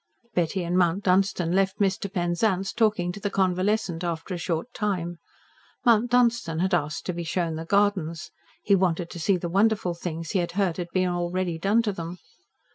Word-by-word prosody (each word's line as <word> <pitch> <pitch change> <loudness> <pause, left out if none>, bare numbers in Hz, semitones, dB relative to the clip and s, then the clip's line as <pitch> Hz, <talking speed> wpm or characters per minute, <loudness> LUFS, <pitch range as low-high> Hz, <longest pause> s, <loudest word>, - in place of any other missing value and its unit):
Betty 180 +2 0
and 175 +1 -1
Mount 180 +2 +2
Dunstan 185 -2 +2
left 195 +1 +1
Mr. 195 -1 0
Penzance 190 +2 0
talking 215 -6 +1
to 200 - -8
the 205 - -2
convalescent 185 -1 0
after 170 +1 -3
a - - -2
short 170 +7 -3
time. 175 -5 -2 0.7
Mount 235 0 +4
Dunstan 240 -9 +2
had 185 +3 0
asked 150 -3 -1
to 180 - -2
be 170 0 -4
shown 170 0 -1
the 160 +1 -5
gardens. 190 -4 0 0.3
He 200 - +3
wanted 180 -3 +1
to 170 - -7
see 185 +3 +2
the 175 - -4
wonderful 200 0 +2
things 165 -1 -5
he 195 - +1
had 170 -1 -2
heard 190 -3 0
had 175 -1 -4
been 185 -1 +1
already 175 -1 -2
done 205 +6 +3
to 215 - 0
them. 170 -1 -6
180 Hz, 190 wpm, -26 LUFS, 170-200 Hz, 0.7 s, Mount